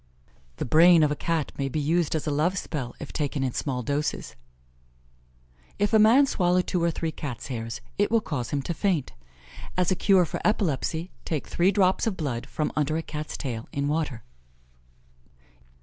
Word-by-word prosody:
The -, -, -3 dB
brain 165 Hz, +3 st, +6 dB
of 150 Hz, -, +2 dB
a -, -, 0 dB
Cat 165 Hz, -1 st, -1 dB
may 135 Hz, 0 st, 0 dB
be 155 Hz, -, -2 dB
used 160 Hz, +2 st, +1 dB
as 155 Hz, -, -2 dB
a 150 Hz, -, 0 dB
love 160 Hz, +7 st, +1 dB
spell 135 Hz, -9 st, -4 dB
if 150 Hz, -, -8 dB
taken 145 Hz, -2 st, -1 dB
in 130 Hz, -, 0 dB
small 125 Hz, -1 st, -2 dB
doses. 145 Hz, +5 st, -2 dB, 1.4 s
If 205 Hz, +1 st, 0 dB
a 220 Hz, -, +6 dB
man 235 Hz, +7 st, +6 dB
swallow 180 Hz, -7 st, +2 dB
two 180 Hz, 0 st, -1 dB
or 170 Hz, -, +3 dB
three 165 Hz, 0 st, -2 dB
Cat's 140 Hz, -4 st, -6 dB
hairs, 115 Hz, -1 st, -5 dB, 0.2 s
it 205 Hz, -, +3 dB
will 230 Hz, -, +4 dB
cause 145 Hz, -, -4 dB
him 140 Hz, +1 st, -2 dB
to 170 Hz, -, -2 dB
faint. 170 Hz, -5 st, 0 dB, 0.6 s
As 180 Hz, 0 st, +2 dB
a -, -, +3 dB
cure 190 Hz, -1 st, +4 dB
for -, -, -5 dB
epilepsy, 170 Hz, -, 0 dB
take 155 Hz, -4 st, -3 dB
three 175 Hz, +2 st, +2 dB
drops 190 Hz, +2 st, +2 dB
of 200 Hz, -4 st, -1 dB
blood 130 Hz, -7 st, -3 dB
from 155 Hz, -, -2 dB
under 150 Hz, +1 st, +1 dB
a 165 Hz, -, -3 dB
Cat's 150 Hz, -1 st, -5 dB
tail 120 Hz, -4 st, -5 dB
in 140 Hz, 0 st, -1 dB
water. 145 Hz, -6 st, -2 dB
155 Hz, 185 wpm, -26 LUFS, 140-180 Hz, 1.4 s, brain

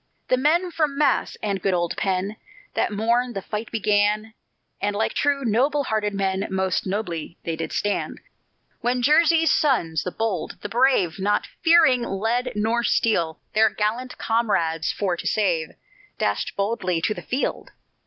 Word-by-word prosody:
The -, -, +5 dB
men 335 Hz, +7 st, +2 dB
from 305 Hz, -4 st, 0 dB
Mass. 300 Hz, -, +1 dB
and 200 Hz, -3 st, -1 dB
good 190 Hz, -1 st, +1 dB
old 175 Hz, -1 st, -1 dB
Penn. 195 Hz, +2 st, -1 dB, 0.4 s
That -, -, 0 dB
morn 235 Hz, +4 st, +1 dB
the 195 Hz, -, -4 dB
fight 215 Hz, +1 st, -5 dB
began, 210 Hz, 0 st, +1 dB, 0.5 s
And 205 Hz, 0 st, 0 dB
like 220 Hz, +2 st, 0 dB
true, 280 Hz, -2 st, 0 dB
noble 270 Hz, +6 st, +2 dB
hearted 215 Hz, -4 st, -1 dB
men, 195 Hz, 0 st, -1 dB
Most 190 Hz, 0 st, -1 dB
nobly 180 Hz, -4 st, -4 dB
they 165 Hz, -, -2 dB
did 160 Hz, -1 st, -5 dB
stand. 205 Hz, 0 st, -2 dB, 0.6 s
When 245 Hz, 0 st, 0 dB
Jersey's 325 Hz, +3 st, +4 dB
sons, 170 Hz, -, +2 dB
the -, -, -3 dB
bold, 215 Hz, -6 st, -3 dB
the 205 Hz, -, -5 dB
brave, 235 Hz, -8 st, +2 dB
Not 205 Hz, +2 st, +1 dB, 0.2 s
fearing 325 Hz, -7 st, +5 dB
lead 230 Hz, +4 st, -1 dB
nor 225 Hz, +3 st, +1 dB
steel, 170 Hz, -10 st, +1 dB
Their 220 Hz, +1 st, +5 dB
gallant 225 Hz, +5 st, -2 dB
comrades 170 Hz, -8 st, 0 dB
for 190 Hz, -4 st, -1 dB
to -, -, -5 dB
save, 175 Hz, -7 st, 0 dB, 0.4 s
Dashed -, -, -1 dB
boldly 200 Hz, -4 st, -1 dB
to 215 Hz, -, +1 dB
the -, -, -8 dB
field. 260 Hz, +3 st, -3 dB
215 Hz, 155 wpm, -23 LUFS, 190-250 Hz, 0.6 s, The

